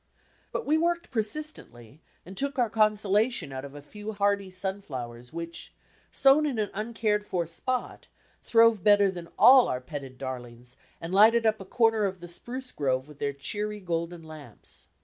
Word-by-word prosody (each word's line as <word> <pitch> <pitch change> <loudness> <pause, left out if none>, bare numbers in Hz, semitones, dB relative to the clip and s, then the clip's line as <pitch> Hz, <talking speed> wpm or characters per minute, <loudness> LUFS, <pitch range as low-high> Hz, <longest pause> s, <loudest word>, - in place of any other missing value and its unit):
But - - -3
we 310 +2 +2
worked 340 +1 -1
persistently, 210 - -4 0.2
and 190 +3 -10
took 280 +4 -2
our 240 -4 +1
consolation 215 - +1
out 130 0 -5
of 140 0 -10
a 145 - -10
few 210 +7 -8
hardy 200 -1 0
sunflowers 140 -11 -6
which, 170 0 -7 0.4
sown 280 +3 +4
in 265 -5 -3
an 210 -2 -1
uncared 215 0 -1
for 180 -4 -2
spot, 245 +10 -3 0.3
throve 230 -4 +4
better 205 -2 +5
than 175 -2 -9
all 255 0 +8
our 125 - -2
petted 135 -1 -8
dar 130 -2 -4
lings, 120 +1 -13 0.2
and 165 +2 -6
lighted 225 +4 +6
up 220 0 +2
a - - -8
comer 225 0 +2
of 190 -1 -3
the 175 - -9
spruce 250 +9 -5
grove 130 -2 -1
with 150 -1 -15
their 140 - -1
cheery 210 +10 -4
golden 170 -2 -4
lamps. 155 -2 -13
195 Hz, 170 wpm, -27 LUFS, 150-225 Hz, 0.4 s, all